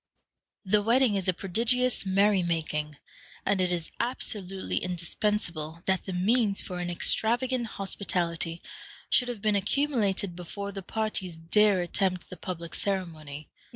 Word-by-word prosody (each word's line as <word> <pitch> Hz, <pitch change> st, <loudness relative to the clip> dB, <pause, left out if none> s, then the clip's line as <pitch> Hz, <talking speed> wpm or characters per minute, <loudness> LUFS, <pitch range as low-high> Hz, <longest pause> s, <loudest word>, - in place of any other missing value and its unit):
The 205 Hz, +2 st, +3 dB
wedding 235 Hz, +2 st, +4 dB
is 195 Hz, -2 st, -1 dB
a -, -, +5 dB
prodigious 230 Hz, +6 st, +1 dB
merry 195 Hz, +1 st, +4 dB
making, 155 Hz, -3 st, -2 dB, 0.5 s
and 195 Hz, -2 st, +2 dB
it 180 Hz, -1 st, +2 dB
is 170 Hz, -2 st, -1 dB
absolutely 200 Hz, -6 st, -2 dB
indispensable 170 Hz, -2 st, -2 dB
that 190 Hz, -1 st, +1 dB
the -, -, -2 dB
means 205 Hz, +3 st, +2 dB
for 180 Hz, -2 st, -2 dB
an 175 Hz, 0 st, -2 dB
extravagant 240 Hz, +7 st, +2 dB
hospitality 175 Hz, -4 st, -1 dB, 0.5 s
should 250 Hz, -, +5 dB
have 235 Hz, -4 st, -5 dB
been 215 Hz, -1 st, +3 dB
accumulated 205 Hz, -4 st, +1 dB
before 200 Hz, +3 st, -6 dB
the 195 Hz, 0 st, -5 dB
parties 190 Hz, -4 st, -1 dB
dare 195 Hz, +4 st, +3 dB
attempt 185 Hz, +1 st, -1 dB
the 185 Hz, -, -7 dB
public 170 Hz, -2 st, -6 dB
ceremony. 155 Hz, -7 st, -3 dB
190 Hz, 135 wpm, -28 LUFS, 175-210 Hz, 0.5 s, a